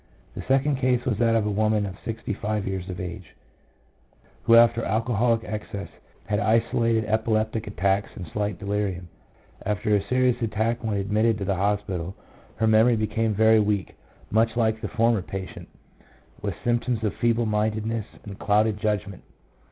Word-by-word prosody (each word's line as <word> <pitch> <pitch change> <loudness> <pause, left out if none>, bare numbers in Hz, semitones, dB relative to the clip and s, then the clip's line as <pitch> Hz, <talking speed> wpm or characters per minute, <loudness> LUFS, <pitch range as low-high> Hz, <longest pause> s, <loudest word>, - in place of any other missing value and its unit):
The - - -6
second 135 +1 +2
case 125 -2 +1
was 115 -5 -1
that 115 -1 +3
of 110 -2 +2
a 105 - 0
woman 105 0 +1
of 95 -2 -6
sixty 115 -2 -4
five 105 0 -2
years 95 -1 -4
of 90 - -5
age, 90 -1 -7 1.1
who 115 - +6
after 115 0 +5
alcoholic 115 +1 +1
excess 105 -2 -6 0.4
had 105 +2 0
isolated 115 +1 +2
epileptic 110 0 0
attacks, 100 -1 0
and 90 - -6
slight 105 -2 -2
delirium. 100 -4 -3 0.5
After 105 +1 0
a 100 - +2
serious 125 +4 +1
attack 115 +2 -1
when 110 -2 -1
admitted 105 +3 +1
to 100 - -4
the 100 - +1
hospital, 95 -2 -1 0.4
her 110 - 0
memory 110 +2 +5
became 110 0 0
very 110 +1 +5
weak, 105 -2 0 0.4
much 110 +2 +2
like 110 -2 +1
the - - -3
former 115 -2 +2
patient, 95 -1 -7 0.7
with 100 -3 -3
symptoms 120 -1 0
of 105 - 0
feeble 115 0 +2
mindedness 110 +1 -1 0.2
and 100 -2 -9
clouded 105 0 +2
judg 105 -1 0
ment. 100 -2 -10
110 Hz, 160 wpm, -25 LUFS, 100-115 Hz, 1.1 s, who